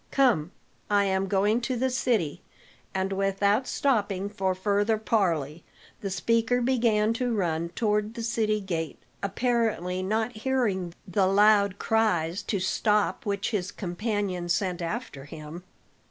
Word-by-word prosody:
Come, 240 - +3 0.4
I 205 -1 +3
am 190 0 0
going 205 +4 +2
to 255 +2 -1
the 260 +2 0
city." 215 - 0 0.5
And 190 0 -1
without 195 +4 +1
stopping 205 -7 0
for 190 -2 -1
further 205 +3 +1
parley, 170 -9 0 0.4
the 195 - -4
speaker 230 +6 +1
began 230 -4 +2
to 245 +1 -1
run 170 -4 -1
toward 210 +2 0
the 230 - -4
city 220 -2 0
gate, 165 -5 -3 0.2
apparently 200 -4 0
not 220 +4 -1
hearing 215 -8 -1
the 190 +1 +2
loud 200 0 +4
cries 200 -7 +1
to 200 - -2
stop 210 +3 +1
which 200 +1 -1
his 200 -3 -2
companion 190 -2 -3
sent 180 0 0
after 170 - -5
him. 155 +3 -9
205 Hz, 135 wpm, -27 LUFS, 185-225 Hz, 0.5 s, loud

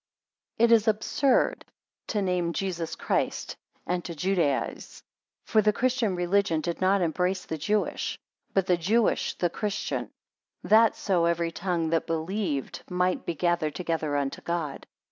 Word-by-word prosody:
11 235 +1 +5
It - - +10
is 225 0 +1
absurd 220 +5 +2 0.4
to 210 -3 -1
name 180 -2 0
Jesus 175 -4 -3
Christ, - - -1 0.3
and 180 0 -1
to 170 0 -6
Judaize. 170 -4 -1 0.4
For 220 - +3
the 210 0 +4
christian 240 -3 0
religion 175 -1 +1
did 170 +3 -3
not 190 +1 +3
embrace 180 +3 0
the 160 - -4
Jewish, 205 +7 -1 0.3
but 195 -2 +2
the 180 -2 +3
Jewish 215 +7 +1
the 175 -2 0
christian; 210 -2 -3 0.5
that 220 +1 +5
so 180 -4 +1
every 170 0 +1
tongue 170 -2 -1
that 165 - +1
believed 165 -2 -2
might 180 0 0
be 170 - -1
gathered 170 -3 0
together 160 -4 -1
unto 140 -1 -2
God. 165 -5 -3
180 Hz, 145 wpm, -27 LUFS, 165-200 Hz, 0.5 s, It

